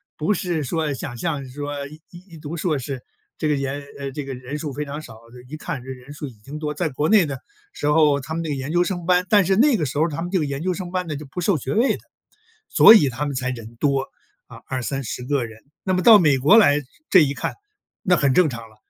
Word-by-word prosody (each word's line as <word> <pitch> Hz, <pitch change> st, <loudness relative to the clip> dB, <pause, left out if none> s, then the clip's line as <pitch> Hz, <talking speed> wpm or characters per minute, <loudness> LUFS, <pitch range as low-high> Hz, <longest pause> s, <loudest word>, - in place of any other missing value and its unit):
不 165 Hz, +7 st, 0 dB
是 175 Hz, -4 st, -2 dB
说 150 Hz, +1 st, -1 dB
想 120 Hz, -1 st, -6 dB
象 140 Hz, +3 st, -2 dB
说 145 Hz, +1 st, -5 dB
一 155 Hz, +2 st, -13 dB
一 175 Hz, -1 st, -13 dB
读 150 Hz, +2 st, -7 dB
硕 160 Hz, -2 st, 0 dB
士， 135 Hz, -1 st, -5 dB, 0.4 s
这 155 Hz, -, 0 dB
个 150 Hz, -, +2 dB
研 135 Hz, +1 st, -3 dB, 0.2 s
呃， 140 Hz, -1 st, -5 dB
这 145 Hz, +1 st, -5 dB
个 135 Hz, -1 st, -6 dB
人 130 Hz, +4 st, -6 dB
数 150 Hz, -1 st, -4 dB
非 145 Hz, +2 st, -4 dB
常 145 Hz, +2 st, -6 dB
少， 115 Hz, -7 st, -12 dB, 0.2 s
这 125 Hz, -, -12 dB
一 155 Hz, -, -5 dB
看 150 Hz, -5 st, -5 dB
这 130 Hz, -, -11 dB
人 130 Hz, +2 st, -9 dB
数 150 Hz, 0 st, -6 dB
已 130 Hz, -, -11 dB
经 125 Hz, +8 st, -10 dB
多 150 Hz, -1 st, -3 dB
在 160 Hz, +2 st, -1 dB
国 150 Hz, +3 st, -1 dB
内 210 Hz, -5 st, +5 dB
的 140 Hz, -3 st, -5 dB, 0.3 s
时 145 Hz, -, -3 dB
候 150 Hz, -2 st, +4 dB
他 160 Hz, +4 st, -6 dB
们 165 Hz, -, -2 dB
那 160 Hz, -, -4 dB
个 145 Hz, -, -1 dB
研 135 Hz, +2 st, -4 dB
究 175 Hz, +1 st, +3 dB
生 175 Hz, -2 st, -4 dB
班 180 Hz, 0 st, +3 dB
但 205 Hz, -3 st, +5 dB
是 190 Hz, +2 st, +2 dB
那 265 Hz, +4 st, +4 dB
个 155 Hz, -, -1 dB
时 135 Hz, -, -5 dB
候 160 Hz, +3 st, +3 dB
他 160 Hz, 0 st, -5 dB
们 175 Hz, -, -4 dB
这 190 Hz, -, +1 dB
个 155 Hz, -, 0 dB
研 140 Hz, +1 st, -4 dB
究 185 Hz, 0 st, -1 dB
生 180 Hz, -1 st, -6 dB
班 185 Hz, -1 st, -2 dB
呢， 155 Hz, -, -3 dB
就 150 Hz, +1 st, -7 dB
不 160 Hz, +6 st, -6 dB
授 185 Hz, -1 st, +2 dB
学 130 Hz, -1 st, -4 dB
位 235 Hz, +5 st, +3 dB
的， -, -, -20 dB, 0.7 s
所 220 Hz, -, +9 dB
以 160 Hz, -10 st, +6 dB
他 130 Hz, +4 st, -3 dB
们 145 Hz, -, -3 dB
才 130 Hz, -1 st, -2 dB
人 115 Hz, -2 st, -7 dB
多， 140 Hz, +1 st, +1 dB, 0.5 s
啊， -, -, -13 dB
20-30 125 Hz, -2 st, -4 dB
个 135 Hz, -2 st, 0 dB
人。 110 Hz, -1 st, -13 dB, 0.2 s
那 185 Hz, -, 0 dB
么 185 Hz, -, 0 dB
到 225 Hz, -3 st, +9 dB
美 150 Hz, -6 st, +4 dB
国 150 Hz, -, +6 dB
来 150 Hz, -10 st, +5 dB, 0.3 s
这 185 Hz, -5 st, +7 dB
一 140 Hz, -, 0 dB
看， -, -, -3 dB, 0.5 s
那 185 Hz, -3 st, +4 dB
很 140 Hz, -2 st, +2 dB
正 175 Hz, -1 st, +4 dB
常 115 Hz, -2 st, -8 dB
了， 110 Hz, -, -21 dB
150 Hz, 285 characters per minute, -22 LUFS, 135-170 Hz, 0.7 s, 所